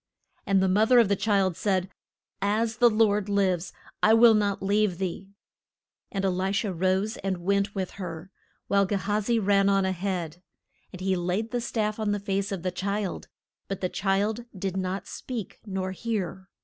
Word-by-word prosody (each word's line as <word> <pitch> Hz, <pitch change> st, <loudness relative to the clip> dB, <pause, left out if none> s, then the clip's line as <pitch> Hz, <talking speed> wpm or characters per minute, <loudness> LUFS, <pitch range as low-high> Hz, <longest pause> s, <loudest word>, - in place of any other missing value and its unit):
And 195 Hz, -1 st, +3 dB
the -, -, +3 dB
moth 210 Hz, +4 st, +3 dB
er -, -, +8 dB
of 230 Hz, -4 st, +5 dB
the 200 Hz, -, +3 dB
child 195 Hz, -3 st, +1 dB
said, 190 Hz, 0 st, 0 dB, 0.5 s
As 220 Hz, +3 st, 0 dB
the 240 Hz, -1 st, +6 dB
Lord 210 Hz, -2 st, +2 dB
lives, 190 Hz, -3 st, +1 dB, 0.3 s
I 220 Hz, +1 st, +6 dB
will 230 Hz, 0 st, +7 dB
not 205 Hz, -2 st, 0 dB
leave 200 Hz, -2 st, +2 dB
thee. 190 Hz, +1 st, -4 dB, 0.8 s
And 195 Hz, -1 st, -1 dB
E -, -, +3 dB
li 190 Hz, +1 st, 0 dB
sha 205 Hz, 0 st, 0 dB
rose 190 Hz, +5 st, 0 dB
and 190 Hz, -1 st, -2 dB
went 200 Hz, +3 st, 0 dB
with 190 Hz, -2 st, -2 dB
her, 170 Hz, +1 st, -6 dB, 0.4 s
while 200 Hz, -1 st, +3 dB
Ge 205 Hz, -, -2 dB
ha 205 Hz, +2 st, 0 dB
zi 235 Hz, +3 st, +1 dB
ran 200 Hz, -2 st, +3 dB
on 195 Hz, -1 st, +3 dB
a 190 Hz, -, +1 dB
head. 180 Hz, -3 st, -3 dB, 0.5 s
And 185 Hz, -, -10 dB
he 190 Hz, 0 st, +1 dB
laid 185 Hz, +6 st, -2 dB
the 245 Hz, -, -1 dB
staff 215 Hz, -2 st, -2 dB
on 210 Hz, -1 st, 0 dB
the 205 Hz, -, -1 dB
face 200 Hz, 0 st, -2 dB
of 190 Hz, -4 st, -4 dB
the 185 Hz, -, -1 dB
child, 200 Hz, +1 st, -3 dB, 0.4 s
but 195 Hz, -, -4 dB
the 185 Hz, -, 0 dB
child 205 Hz, +5 st, 0 dB
did 190 Hz, 0 st, -3 dB
not 190 Hz, +1 st, -2 dB
speak 235 Hz, -7 st, -6 dB
nor 190 Hz, -1 st, -2 dB
hear. 190 Hz, -2 st, -4 dB
195 Hz, 190 wpm, -27 LUFS, 185-210 Hz, 0.8 s, er